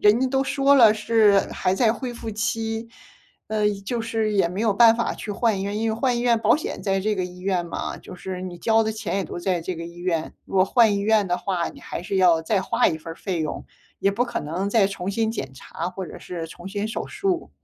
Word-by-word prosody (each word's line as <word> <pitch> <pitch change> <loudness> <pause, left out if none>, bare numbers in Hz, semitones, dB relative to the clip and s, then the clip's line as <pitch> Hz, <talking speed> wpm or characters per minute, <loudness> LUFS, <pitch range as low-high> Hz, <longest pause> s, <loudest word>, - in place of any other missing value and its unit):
人 210 +2 +5
家 260 - +3
都 265 +1 +1
说 275 0 +3
了 230 -5 +7
是 215 -2 +4
还 185 - 0
在 225 0 +3
恢 250 -1 -5
复 230 -1 -6
期， 225 +1 -2 0.6
呃， 210 -1 +1 0.2
就 235 +3 -2
是 225 -1 -1
也 195 -4 +3
没 185 +4 -4
有 220 -3 +3
办 230 +2 +6
法 235 - 0
去 210 - -7
换 215 0 +1
医 - - -2
院。 205 +1 -2
因 225 - 0
为 - - -1
换 245 +1 +1
医 - - -1
院 240 -1 +3
保 - - +4
险 310 - -5
在 195 -1 +1
这 210 +2 0
个 185 -2 -1
医 180 0 -9
院 185 -2 0
嘛， - - -4
就 - - -11
是 185 0 -6
你 185 -1 -6
交 225 +4 +3
的 220 - -1
钱 205 -4 -3
也 195 - -1
都 - - -6
在 175 -1 0
这 180 +1 -4
个 165 - -6
医 170 - -12
院。 170 -3 -2
如 - - -10
果 185 - +6
换 220 +1 +4
医 - - 0
院 210 0 +3
的 180 - +1
话， 180 -3 -2
你 - - -13
还 - - -6
是 195 +2 -2
要 175 -3 +5
再 195 +3 +1
花 - - +2
一 160 - -2
份 165 +1 -8
儿 - - -13
费 180 -4 -3
用， 155 - -3 0.3
也 195 - +2
不 235 +5 0
可 235 - -3
能 175 +7 -3
再 205 -3 +4
重 195 -1 -4
新 220 +2 0
检 135 - -5
查 165 +6 -6
或 185 0 -6
者 - - -10
是 170 -2 -6
重 175 +2 -11
新 205 +2 -3
手 225 - -4
术。 390 -4 -2
205 Hz, 280 characters per minute, -24 LUFS, 180-225 Hz, 0.6 s, 了